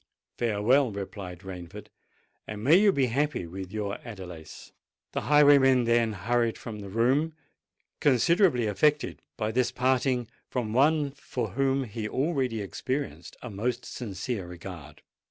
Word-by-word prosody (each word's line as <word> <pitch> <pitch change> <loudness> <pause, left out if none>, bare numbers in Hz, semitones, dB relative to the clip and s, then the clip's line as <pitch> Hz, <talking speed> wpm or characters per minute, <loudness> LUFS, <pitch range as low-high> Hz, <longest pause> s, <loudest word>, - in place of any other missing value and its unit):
"Farewell," 120 +3 +3
replied 95 -3 -7
Rainford; 90 -3 -9 0.6
"and 105 0 -6
may 145 +7 +6
you 200 +2 +6
be 140 -8 +2
happy 135 - -1
with 95 +2 -7
your 105 -2 -3
Adelais." 90 -8 -10 0.4
The - - -2
highwayman 140 -3 +6
then 115 -1 +2
hurried 115 +4 0
from 110 -2 -7
the 100 -1 -8
room, 130 +9 +1 0.6
considerably 145 - +3
affected 145 +9 +1 0.2
by 110 0 -1
this 125 +1 +1
parting 130 -1 +1 0.2
from 115 -4 -2
one 145 +2 +3
for 130 -4 -4
whom 135 +4 +1
he 110 -2 -5
already 130 -6 0
experienced 130 +8 -4
a 125 - -6
most 120 +5 -2
sincere 100 -3 -5
regard. 85 -4 -10
120 Hz, 135 wpm, -28 LUFS, 100-135 Hz, 0.6 s, may